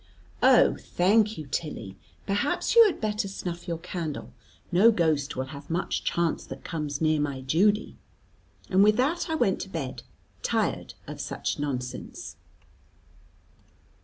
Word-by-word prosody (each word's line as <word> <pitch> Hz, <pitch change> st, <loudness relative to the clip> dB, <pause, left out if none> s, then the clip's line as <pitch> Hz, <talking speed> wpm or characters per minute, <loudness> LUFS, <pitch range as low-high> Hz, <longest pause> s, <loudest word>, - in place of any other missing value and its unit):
"Oh, -, -, +6 dB
thank 210 Hz, +4 st, +2 dB
you, 155 Hz, -, -6 dB
Tilly. 130 Hz, -, -4 dB, 0.3 s
Perhaps 205 Hz, -, 0 dB
you 465 Hz, -, +10 dB
had 390 Hz, -, -2 dB
better 210 Hz, -1 st, -1 dB
snuff 175 Hz, -2 st, -6 dB
your 170 Hz, -1 st, -2 dB
candle. 165 Hz, -3 st, -5 dB, 0.4 s
No 195 Hz, +6 st, +6 dB
ghost 155 Hz, -8 st, +1 dB
will 130 Hz, -, -1 dB
have 140 Hz, 0 st, -10 dB
much 170 Hz, +3 st, -1 dB
chance 170 Hz, -1 st, 0 dB
that 135 Hz, 0 st, -9 dB
comes 150 Hz, -3 st, -4 dB
near 155 Hz, -1 st, +3 dB
my 140 Hz, -3 st, -2 dB
Judy." 190 Hz, +11 st, +2 dB, 0.7 s
And 195 Hz, +1 st, +4 dB
with 210 Hz, +1 st, +5 dB
that 320 Hz, +8 st, +1 dB
I 320 Hz, -, 0 dB
went 195 Hz, -11 st, +1 dB
to 190 Hz, -, -6 dB
bed, 135 Hz, -9 st, -5 dB, 0.4 s
tired -, -, -1 dB
of -, -, -7 dB
such -, -, -3 dB
nonsense. 125 Hz, -4 st, -5 dB
170 Hz, 140 wpm, -27 LUFS, 145-205 Hz, 0.7 s, you